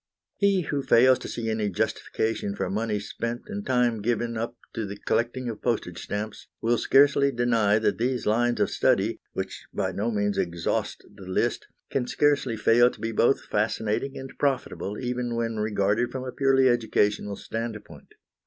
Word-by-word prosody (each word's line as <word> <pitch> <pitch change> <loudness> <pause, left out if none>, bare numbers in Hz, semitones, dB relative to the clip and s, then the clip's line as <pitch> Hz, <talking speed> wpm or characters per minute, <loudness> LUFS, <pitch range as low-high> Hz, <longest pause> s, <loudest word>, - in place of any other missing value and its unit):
He 200 -2 +3
who 145 -3 -2
fails 130 0 +5
to - - -7
see 115 -1 -4
any 110 -2 0
justification 100 +2 -2
for 95 -2 -2
money 105 +1 -1
spent 115 +3 -4
and 205 -1 -5
time 120 - +1
given 115 +1 -1
up 115 +2 -4 0.2
to 110 -3 -3
the 100 +1 -7
collecting 120 +4 -1
of 115 -3 -5
postage 105 -8 -2
stamps 105 +1 -5
will 115 0 +1
scarcely 140 +1 +4
deny 115 -4 +2
that 110 - 0
these 125 +1 0
lines 120 +3 +2
of - - +1
study, - - +2
which - - -5
by - - -1
no 105 +4 -1
means 105 -2 0
exhaust 85 -1 -2
the 95 - -12
list, 95 - -1 0.2
can 125 -3 0
scarcely 140 -5 +1
fail 120 +3 +5
to - - -13
be 115 - -2
both 120 +4 +2
fascinating 110 +5 -1
and 135 0 -8
profitable, 130 -7 -1
even 125 -1 -2
when 115 -1 -2
regarded 105 +2 +1
from 130 -1 -5
a 130 - -5
purely 135 +1 +3
educational 105 -4 +1
standpoint. 115 0 -7
115 Hz, 170 wpm, -26 LUFS, 105-125 Hz, 0.2 s, fails